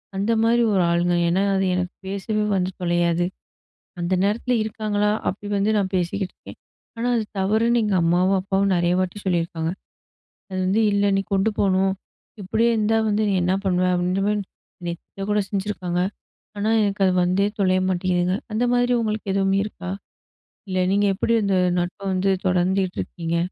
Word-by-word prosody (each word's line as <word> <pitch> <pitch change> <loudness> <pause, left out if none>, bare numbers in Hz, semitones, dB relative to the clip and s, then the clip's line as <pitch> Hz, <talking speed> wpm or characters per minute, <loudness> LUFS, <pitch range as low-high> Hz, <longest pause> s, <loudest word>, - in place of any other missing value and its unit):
அந்த 200 +4 0
மாரி 235 +1 +3
ஒரு 185 - +3
ஆளுங்க. 175 +1 +2
ஏன்னா, 180 +3 +2
அது 195 0 +1
எனக்கு 180 0 -2
பேசவே 200 +2 -2
வந்து 185 -1 0
தொலையாது. 175 0 +1 0.8
அந்த 175 +2 0
நேரத்துல 235 +5 0
இருக்காங்களா? 210 -1 -1 0.2
அப்படி 205 +2 -5
வந்து 200 +2 +1
நான் 195 -1 -1
பேசிக்கிட்டு 185 +2 -2
இருக்கேன். - - -13 0.4
ஆனா, 235 +2 -1
அது 225 - 0 0.2
தவறுன்னு 225 +5 +2
எங்க 205 -3 +1
அம்மாவும், 180 +3 +3
அப்பாவும் 195 0 +1
நெறைய 175 0 +2
வாட்டி 185 +2 -2
சொல்லியிருக்காங்க. 165 -2 -1 0.8
அது 185 - -4
வந்து 195 +4 +2
"இல்ல, 200 0 +2
நீ - - +2
கொண்டு 195 +3 +2
போணும். 190 -1 +2 0.5
இப்படியே 225 +5 +1
இருந்தா, 220 +1 +2
வந்து 215 +1 +1
நீ - - +1
என்ன 180 +1 +2
பண்ணுவ?" 185 -1 +1
அப்டீங்குற 180 +2 0
மாரி 210 0 +1 0.5
திட்ட 180 +3 -7
கூட 210 0 +2
செஞ்சுருக்காங்க. 190 -3 -2 0.6
ஆனா, 210 +2 0
எனக்கு 200 -1 0
அது 185 - +3
வந்தே 185 +3 +2
தொலைய 185 -1 +3
மாட்டேங்குதுங்க! 180 0 0 0.2
அந்த 230 +3 +1
மாதிரி 245 0 +2
உங்களுக்கு 215 -2 -2
எதுவுமே 195 0 +2
இருக்கா? 185 -3 -7 0.8
இல்ல 185 0 -1
நீங்க 205 +1 +2
எப்படி 230 +4 0
அந்த 200 -1 +1 0.2
நட்ப 175 +4 -3
வந்து 190 +1 +1 0.2
தொடர்ந்துட்டு 185 +1 +1
இருக்கீங்க? 170 -1 -3
195 Hz, 160 wpm, -23 LUFS, 180-210 Hz, 0.8 s, மாரி